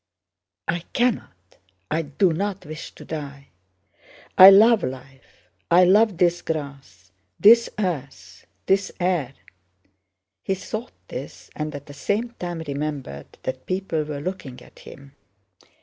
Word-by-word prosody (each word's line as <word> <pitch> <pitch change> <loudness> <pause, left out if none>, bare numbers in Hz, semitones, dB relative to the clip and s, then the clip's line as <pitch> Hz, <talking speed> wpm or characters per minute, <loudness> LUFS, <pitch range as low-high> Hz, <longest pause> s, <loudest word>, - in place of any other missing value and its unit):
"I 175 - 0
cannot, 150 - -2 0.3
I 160 +2 +1
do 160 +4 +1
not 195 +3 -3
wish 155 +2 -8
to - - -12
die. 140 -3 -7 0.9
I 190 +1 +11
love 215 +3 +6
life—I 130 - -2
love 200 +1 +4
this 175 -1 +2
grass, 140 - -6 0.3
this 230 +2 +7
earth, 135 - -5 0.2
this 195 +1 +1
air...." 175 -8 -1 1.1
He 195 - -1
thought 215 +5 -6 0.2
this, - - -8
and 150 -1 -4
at 145 0 -8
the 145 - -11
same 205 - -2
time 175 -2 -4
remembered 140 - -5
that 130 0 -5
people 185 -4 -1
were 150 -1 -6
looking 150 -7 -6
at - - -19
him. 140 0 -14
155 Hz, 125 wpm, -23 LUFS, 140-190 Hz, 1.1 s, I